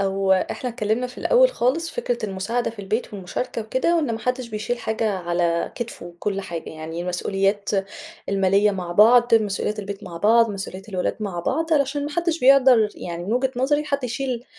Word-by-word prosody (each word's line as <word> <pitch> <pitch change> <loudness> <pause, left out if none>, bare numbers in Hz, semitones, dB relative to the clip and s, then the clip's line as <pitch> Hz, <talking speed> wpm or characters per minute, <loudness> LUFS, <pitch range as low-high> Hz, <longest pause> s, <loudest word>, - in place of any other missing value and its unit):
أو 195 0 +1
إحنا 240 +6 -1
تكلّمنا 225 +1 -1
في 250 - -12
الأول - - +5
خالص 320 - 0
فكرة 245 - -2
المساعدة 200 +6 -2
في 225 - -17
البيت 210 +2 -3
والمشاركة 200 +5 -4
وكده، 260 +10 +1
وإن 295 -8 0
ما 225 - -3
حدش 250 +1 -2
بيشيل 215 +3 -3
حاجة 220 -1 -1
على 170 -1 0
كتفُه 175 -8 -7
كل 200 -1 -2
حاجة، 170 -4 -6
يعني 160 +2 -6
المسؤوليات 195 +3 -1 0.6
المالية 195 +1 +3
مع 180 -3 -4
بعض، 235 +4 +6
مسؤوليات 210 0 0
البيت 200 0 -6
مع 170 - -8
بعض، 225 +4 +4
مسؤوليات 195 0 -7
الولاد 185 -3 -2
مع 190 -5 -3
بعض، 320 - -1
علشان 285 0 +1
ما 295 - -4
حدش 340 0 -1
بيقدر 255 -4 +6
يعني 175 0 -6
من 205 - -2
وجهة 255 +2 +1
نظري 290 +4 +1
حد 280 -3 -2
يشيل 245 0 -3
220 Hz, 180 wpm, -23 LUFS, 195-255 Hz, 0.6 s, بعض